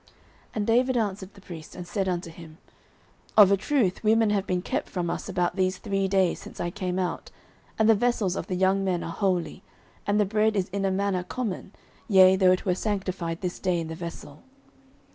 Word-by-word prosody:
09:021:005 - - -27 0.5
And 210 -1 -1
David 250 +3 +2
answered 195 -3 -2
the 200 - -15
priest, 165 -4 -10
and 175 -1 -8
said 190 +1 -1
unto 175 -2 -3
him, 160 -1 -13 0.8
Of 200 -2 +8
a - - +6
truth 205 -3 0
women 220 0 +3
have 200 -2 0
been 180 -1 -1
kept - - -2
from 175 -3 -2
us - - -5
about 175 0 0
these 185 0 +1
three 195 -1 -1
days, 190 -2 +2
since - - -11
I 175 - -2
came 185 -1 -3
out, 185 -2 -3 0.5
and 220 - +3
the 225 - +7
vessels 220 -4 +1
of - - -4
the 185 - -2
young 190 +1 +2
men 180 -3 -1
are 165 - -5
holy, 185 -2 -1 0.5
and 205 +1 +2
the 210 - +4
bread 215 +2 +1
is 190 -2 0
in 195 +1 -2
a - - +2
manner 195 -1 0
common, 195 0 -4 0.4
yea, 190 -2 +7
though 185 -1 +4
it 185 - 0
were 185 - +2
sanctified 185 -4 -3
this 180 -2 -4
day 180 -2 0
in 165 -1 -5
the - - -4
vessel. 165 -4 -8
190 Hz, 215 wpm, -26 LUFS, 180-205 Hz, 0.8 s, Of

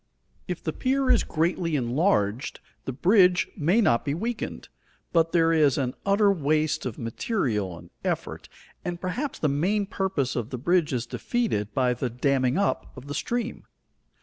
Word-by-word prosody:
If - - -4
the - - -2
pier 265 0 +1
is 245 - +4
greatly 165 0 0
enlarged, 125 - 0 0.3
the - - -2
bridge 180 - +4
may 180 +7 +3
not 120 - +3
be 140 0 -1
weakened, 230 +7 -4 0.5
but 165 -1 +3
there 165 -1 +3
is 150 -5 +4
an 130 -3 -1
utter 200 +1 +4
waste 155 -5 0
of 115 - -6
material 115 - -2
and 85 0 -14
effort, - - -3 0.3
and 175 -1 -4
perhaps 245 +11 -3
the 155 - +1
main 185 +9 +1
purpose 190 -9 -1
of 120 -2 -2
the 130 - -4
bridge 170 +4 +2
is 125 -2 -1
defeated 120 - -1
by 125 -1 +2
the 125 +1 -2
damming 130 +1 +1
up 200 - 0
of 130 - -9
the 145 - -5
stream. 240 +7 -3
155 Hz, 165 wpm, -26 LUFS, 125-195 Hz, 0.5 s, is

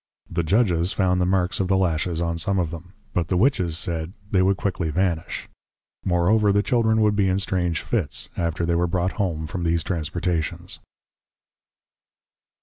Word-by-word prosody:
The 85 - 0
\Judges\ 90 -1 +2
found 90 -2 +2
the 90 - +2
marks 95 +1 +1
of 95 - +1
the 95 0 +3
Lashes 85 -2 0
on 85 -1 -1
some 95 +3 +1
of 85 -4 0
them; 85 +2 -9 0.2
but 85 -2 0
the 90 - 0
Witches 90 - +2
said, 85 0 -2 0.2
\They 95 - +3
would 95 +1 +3
Quickly 85 -5 -1
vanish\. 85 -1 -1 0.6
Moreover 100 +4 +3
the 100 +1 +2
Children 110 -2 +2
would 105 -1 +3
be 100 -2 +2
in 95 - +1
\strange 90 -4 0
Fits\, 90 -12 -1
after 85 0 -1
they 85 - +1
were 85 +1 +2
brought 90 +1 0
Home 80 -5 -1
from 90 +4 -5
these 85 -1 +1
Transportations. 85 -1 -2
90 Hz, 170 wpm, -23 LUFS, 85-95 Hz, 0.6 s, the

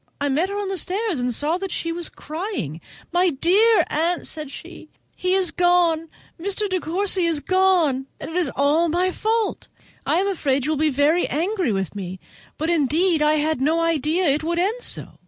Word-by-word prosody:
I 285 - 0
met 315 +8 +1
her 400 - -4
on 410 -1 -2
the 385 -2 -1
stairs, 385 - -1
and 245 0 0
saw 300 +8 0
that 390 0 -4
she 335 -1 -2
was 340 0 -4
crying. 310 - -5 0.3
"My 355 +1 +3
dear 370 +7 +4
aunt," 335 +3 0
said 305 -3 -5
she, - - -11 0.3
"he 365 +1 0
is 370 -3 +2
going—Mr. 350 +3 0
De 370 -1 -1
Courcy 365 +2 0
is 325 -3 +1
going, 335 -5 +2
and - - -7
it - - -7
is 355 -5 +1
all 300 +5 +2
my 360 +3 +1
fault. 445 +3 -1 0.4
I - - +1
am 385 +2 +1
afraid 280 -9 0
you 305 - 0
will 310 - 0
be 310 +1 +2
very 295 +5 +2
angry 355 - -1
with 195 -3 -2
me, 185 -2 -6 0.4
but 320 +3 -1
indeed 320 +2 +2
I 300 0 +4
had 310 -2 0
no 315 +4 +2
idea 330 +2 +1
it 290 +2 +1
would 340 +1 -1
end 415 +8 0
so." - - -4
335 Hz, 195 wpm, -22 LUFS, 295-370 Hz, 0.4 s, dear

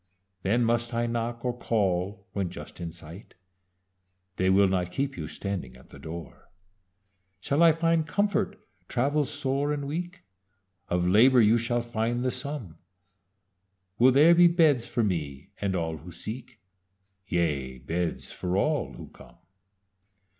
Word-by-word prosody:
Then 115 +6 +2
must 120 +1 0
I 120 0 +1
knock, 120 +1 -3
or 125 -1 0
call 100 -3 -1
when 95 -3 -1
just 90 - -10
in 85 -1 -4
sight? 85 +3 -10 1.0
They 95 0 +2
will 100 +1 +5
not 90 -1 -1
keep 135 +7 -2
you - - -5
standing 95 -11 -5
at 65 - -19
the - - -13
door. 85 +1 -9 0.9
"Shall 140 - 0
I 165 -1 +8
find 165 0 +1
comfort, 205 +3 0 0.3
travel 145 +4 +1
sore 140 +2 -1
and 145 -1 -2
weak? 175 +5 -5 0.7
Of 90 0 +1
labor 120 +7 +6
you 115 +1 +5
shall 120 +1 0
find 120 +1 -2
the 130 - +1
sum. 125 - -6 1.2
Will 125 +2 +7
there 150 +6 +7
be 175 0 +7
beds 160 -8 +3
for 120 - 0
me 75 -9 -3
and 100 -2 0
all 80 -2 -2
who 85 +4 -11
seek? 110 +6 -7 0.7
Yea, 70 -8 -1
beds 85 +6 -3
for 90 +1 -2
all 120 - 0
who - - -10
come. - - -17
115 Hz, 145 wpm, -27 LUFS, 90-140 Hz, 1.2 s, I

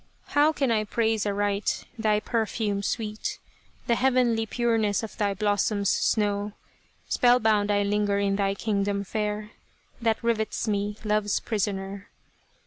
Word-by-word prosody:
How 295 +2 +4
can 275 -5 0
I 215 -2 +2
praise 220 -1 0
aright 205 0 -1
thy 215 -2 +2
perfume 215 -2 -1
sweet, 215 0 -3 0.5
The 235 - +2
heavenly 245 -3 +2
pureness 225 -3 +1
of 220 - -6
thy 205 -2 0
blossom's 205 0 +1
snow: 205 -1 +1 0.5
Spellbound 220 -4 +3
I 205 0 +2
linger 205 0 +1
in 200 0 +1
thy 195 -1 0
Kingdom 200 -1 -1
fair 210 +1 -3 0.5
That 225 -1 +2
rivets 225 -1 0
me, 205 0 -1
love's 210 -1 +1
prisoner 200 -2 -3
210 Hz, 130 wpm, -26 LUFS, 205-225 Hz, 0.5 s, How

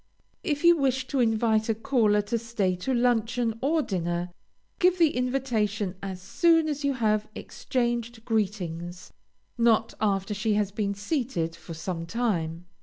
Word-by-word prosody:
If 295 0 -1
you 345 0 +7
wish 265 -2 +1
to 275 - 0
invite 220 -1 +2
a 225 - +2
caller 220 -4 +2
to 230 +3 -1
stay 215 -5 -1
to 180 +9 -3
luncheon 235 -2 +1
or 310 +3 +2
dinner, 175 -3 -2 0.5
give 365 0 +4
the 330 -4 +3
invitation 235 -6 0
as 190 -2 -5
soon 325 - +3
as 295 -1 -3
you 280 -1 +2
have 215 -3 +1
exchanged 235 -2 -3
greetings, 180 -6 -3 0.5
not 230 -1 +3
after 200 -1 0
she 210 +1 0
has 205 -1 0
been 200 -1 -2
seated 205 - -2
for 165 -1 -9
some 165 0 -4
time. 175 -7 -1
220 Hz, 150 wpm, -27 LUFS, 195-250 Hz, 0.5 s, you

